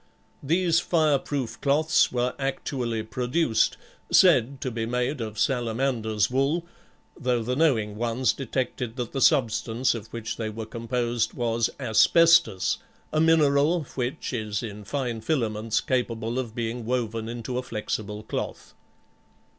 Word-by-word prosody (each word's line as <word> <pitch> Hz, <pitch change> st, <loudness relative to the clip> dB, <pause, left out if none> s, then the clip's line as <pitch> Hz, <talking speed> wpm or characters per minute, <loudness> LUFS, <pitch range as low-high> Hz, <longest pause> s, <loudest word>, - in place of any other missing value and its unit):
These 165 Hz, +3 st, +2 dB
fire 155 Hz, -5 st, +2 dB
proof 135 Hz, -5 st, -4 dB
cloths 150 Hz, +3 st, +3 dB
were 125 Hz, 0 st, 0 dB
actually 125 Hz, -4 st, -2 dB
produced, 125 Hz, +3 st, +1 dB, 0.3 s
said 140 Hz, -7 st, +5 dB
to 130 Hz, -, -2 dB
be 115 Hz, -1 st, -3 dB
made 125 Hz, +3 st, -1 dB
of 110 Hz, -1 st, -5 dB
salamander's 115 Hz, -2 st, 0 dB
wool, 140 Hz, +6 st, +1 dB, 0.5 s
though 125 Hz, -5 st, 0 dB
the 125 Hz, +3 st, -1 dB
knowing 115 Hz, -9 st, +1 dB
ones 120 Hz, +1 st, +1 dB
detected 125 Hz, -2 st, -3 dB
that 120 Hz, -3 st, -4 dB
the 135 Hz, -, -3 dB
substance 115 Hz, +2 st, +2 dB
of 110 Hz, -2 st, -7 dB
which 115 Hz, -1 st, -5 dB
they 110 Hz, -1 st, -3 dB
were 110 Hz, +1 st, -6 dB
composed 120 Hz, +1 st, -2 dB
was 115 Hz, -2 st, 0 dB
asbestos, 120 Hz, -, +4 dB, 0.3 s
a 155 Hz, -, +3 dB
mineral, 160 Hz, 0 st, +4 dB
which 130 Hz, +3 st, -3 dB
is 110 Hz, -3 st, -2 dB
in 105 Hz, -2 st, -7 dB
fine 120 Hz, -2 st, -3 dB
filaments 115 Hz, -4 st, 0 dB
capable 120 Hz, -3 st, -1 dB
of 120 Hz, -3 st, -5 dB
being 120 Hz, 0 st, -3 dB
woven 115 Hz, -2 st, -2 dB
into 120 Hz, +1 st, -4 dB
a -, -, -2 dB
flexible 105 Hz, -3 st, -4 dB
cloth. -, -, -5 dB
120 Hz, 135 wpm, -26 LUFS, 110-135 Hz, 0.5 s, said